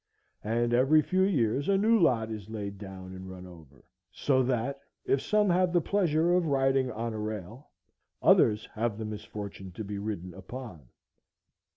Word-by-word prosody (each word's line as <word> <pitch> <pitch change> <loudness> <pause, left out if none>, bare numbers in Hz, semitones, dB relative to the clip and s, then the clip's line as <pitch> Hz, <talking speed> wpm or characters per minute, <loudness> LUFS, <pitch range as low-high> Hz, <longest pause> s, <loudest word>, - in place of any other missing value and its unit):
And 120 +2 0
every 135 +5 +5
few 185 0 +1
years 140 - +1
a 195 - +4
new 220 +3 +4
lot 115 - +2
is 105 -2 -7
laid 100 -3 -5
down 95 -2 -9
and 95 0 -9
run 90 -1 -9
over; 80 -7 -15 0.3
so 130 -2 +1
that, 130 +2 -1 0.3
if 135 - +2
some 210 -1 +2
have 180 0 +3
the 175 - +5
pleasure 170 -2 +2
of 180 -2 +2
riding 135 -2 +2
on 115 +1 -3
a 110 - -4
rail, 105 +4 -6 0.5
others 105 0 +4
have 110 -1 -1
the 110 - -4
misfortune 105 -2 -7
to 110 - -6
be 100 0 -5
ridden 100 -4 -5
upon. 95 - -9
115 Hz, 170 wpm, -29 LUFS, 100-140 Hz, 0.5 s, every